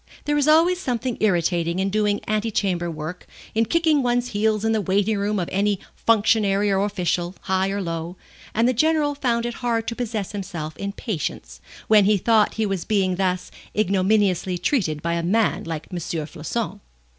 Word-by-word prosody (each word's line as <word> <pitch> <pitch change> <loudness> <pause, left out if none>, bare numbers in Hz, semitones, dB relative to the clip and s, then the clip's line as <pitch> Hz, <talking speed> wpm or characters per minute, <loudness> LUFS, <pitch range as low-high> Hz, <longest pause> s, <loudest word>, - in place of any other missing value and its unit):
There 295 - +1
is 295 0 +2
always 335 +4 +5
something 250 -5 -2
irritating 175 -3 +1
in 195 +1 0
doing 210 0 +1
antechamber 205 -5 0
work, 160 +2 -6 0.3
in 225 +1 +2
kicking 320 0 +2
one's 245 0 0
heels 215 0 0
in 225 - +2
the 220 -1 +1
waiting 200 +3 +1
room 205 +1 0
of 175 -3 -1
any 200 0 +1 0.2
functionary 205 -2 +2
or 195 0 +2
official, 180 -3 -1
high 190 0 0
or 200 0 -2
low, 165 0 -4 0.4
and 230 +2 +3
the 255 - +3
General 305 +3 +2
found 240 -4 0
it 240 - -2
hard 230 -2 0
to 230 - -5
possess 225 -5 -3
himself 180 -6 -5
in 200 0 -3
patience, 155 - -5 0.3
when 210 -2 +6
he 210 +1 +4
thought 220 +2 +3
he 220 - 0
was 195 -4 -2
being 190 -4 +1
thus 185 -1 -1 0.3
ignominiously 190 -2 +2
treated 170 - 0
by 170 0 0
a 170 - 0
man 210 +6 +1
like 160 -2 -5
M. 180 - -3
Floçon. 165 +7 -4
205 Hz, 180 wpm, -23 LUFS, 180-225 Hz, 0.4 s, when